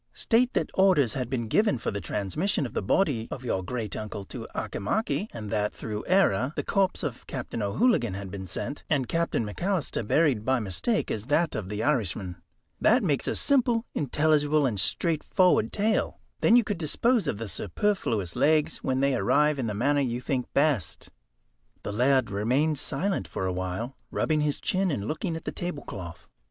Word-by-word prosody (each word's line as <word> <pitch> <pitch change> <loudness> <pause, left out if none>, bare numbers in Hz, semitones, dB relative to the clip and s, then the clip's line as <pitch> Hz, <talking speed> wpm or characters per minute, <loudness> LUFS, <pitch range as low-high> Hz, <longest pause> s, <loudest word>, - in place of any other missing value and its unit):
State 245 +2 +2
that - - -1
orders 180 - +4
had 125 -3 -3
been 120 -3 -2
given 210 - +2
for - - -3
the 100 -1 -4
transmission 105 - -1
of 120 - -7
the - - -1
body 115 - +1
of 130 - -7
your 95 -5 0
great 110 0 -4
uncle 105 -1 -5
to - - -8
Auchimachie, 210 - -1
and 105 -3 -7
that, 105 -1 0
through 105 -1 -5
error, 145 - +3
the - - -2
corpse 195 -2 +1
of 135 -6 -5
Captain 125 -3 -4
O'Hooligan 115 - +2
had 100 -1 -6
been 95 -1 -6
sent, 140 - -5
and 140 -5 +1
Captain 165 -7 0
McAlister 175 - -2
buried 140 -8 +3
by 130 +2 +2
mistake 115 - -1
as 105 0 -3
that 155 +5 +1
of 100 -4 -4
the 105 +1 -3
Irishman. 100 - 0 0.4
That 235 +2 +4
makes 150 -7 0
a - - 0
simple, 245 -4 +2
intelligible, 150 +1 +2
and 110 -6 0
straightforward 180 - +2
tale. 215 +1 0 0.2
Then 230 - +5
you 245 - +6
could 205 -4 -3
dispose 215 - +1
of 105 - -1
the 115 +1 -5
superfluous 105 - -1
legs 155 0 +2
when 130 0 -1
they 140 0 +3
arrived 150 +8 +2
in 120 - -1
the 105 - -3
manner 140 +6 +2
you 120 -3 -1
think 125 0 -2
best." 135 - +1 0.7
The - - -4
laird 125 +1 +2
remained 130 +9 +1
silent 195 +5 -1
for 95 - -4
a 95 - -1
while, 95 +8 -4
rubbing 155 -1 0
his 150 -1 0
chin, 190 0 0
and 110 -10 -2
looking 165 - -2
at 160 - -7
the - - -2
tablecloth. 100 - -6
135 Hz, 185 wpm, -27 LUFS, 105-170 Hz, 0.7 s, you